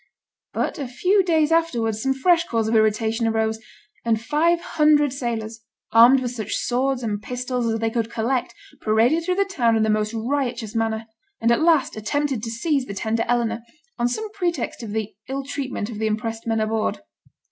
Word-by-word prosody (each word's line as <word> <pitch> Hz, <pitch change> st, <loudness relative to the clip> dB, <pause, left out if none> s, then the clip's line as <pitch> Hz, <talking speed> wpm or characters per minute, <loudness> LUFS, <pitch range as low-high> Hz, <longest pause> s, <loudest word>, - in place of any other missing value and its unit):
But -, -, -2 dB
a 275 Hz, -, -3 dB
few 365 Hz, +11 st, +2 dB
days 320 Hz, -3 st, +2 dB
afterwards 235 Hz, -10 st, +1 dB
some 270 Hz, +1 st, +1 dB
fresh 335 Hz, +5 st, +3 dB
cause 225 Hz, -2 st, 0 dB
of 225 Hz, -, +1 dB
irritation 220 Hz, +1 st, +2 dB
arose, 220 Hz, 0 st, 0 dB, 0.4 s
and 225 Hz, -2 st, +1 dB
five 310 Hz, +8 st, +2 dB
hundred 300 Hz, -4 st, +3 dB
sailors, 230 Hz, -4 st, -4 dB, 0.3 s
armed 240 Hz, +4 st, +7 dB
with 245 Hz, -2 st, -2 dB
such 220 Hz, -4 st, -4 dB
swords 255 Hz, +1 st, 0 dB
and 210 Hz, -2 st, -2 dB
pistols 250 Hz, +1 st, -2 dB
as 225 Hz, -, -1 dB
they 225 Hz, 0 st, 0 dB
could 230 Hz, -1 st, -1 dB
collect, 240 Hz, +2 st, -1 dB, 0.3 s
paraded 230 Hz, +10 st, +3 dB
through 360 Hz, +2 st, 0 dB
the 395 Hz, +1 st, +2 dB
town 245 Hz, -13 st, +1 dB
in 220 Hz, -, +2 dB
the 220 Hz, -, +2 dB
most 215 Hz, +1 st, 0 dB
riotous 240 Hz, -2 st, -2 dB
manner, 225 Hz, -1 st, -1 dB, 0.3 s
and 230 Hz, +1 st, +2 dB
at 235 Hz, -, +3 dB
last 320 Hz, -5 st, +3 dB
attempted 270 Hz, +3 st, -1 dB
to 225 Hz, -, -4 dB
seize 265 Hz, +3 st, -1 dB
the 200 Hz, -, -6 dB
tender 225 Hz, +3 st, -1 dB
Eleanor, 235 Hz, -1 st, 0 dB, 0.4 s
on 240 Hz, -, +2 dB
some 430 Hz, -, -3 dB
pretext 355 Hz, -9 st, -2 dB
of 225 Hz, -, -6 dB
the 220 Hz, -1 st, -3 dB, 0.2 s
ill 275 Hz, +1 st, -3 dB
treatment 265 Hz, -5 st, -4 dB
of 215 Hz, -, -7 dB
the 220 Hz, -, 0 dB
impressed 225 Hz, +1 st, -3 dB
men 225 Hz, -1 st, +1 dB
aboard. 215 Hz, -, -1 dB
235 Hz, 190 wpm, -23 LUFS, 225-280 Hz, 0.4 s, armed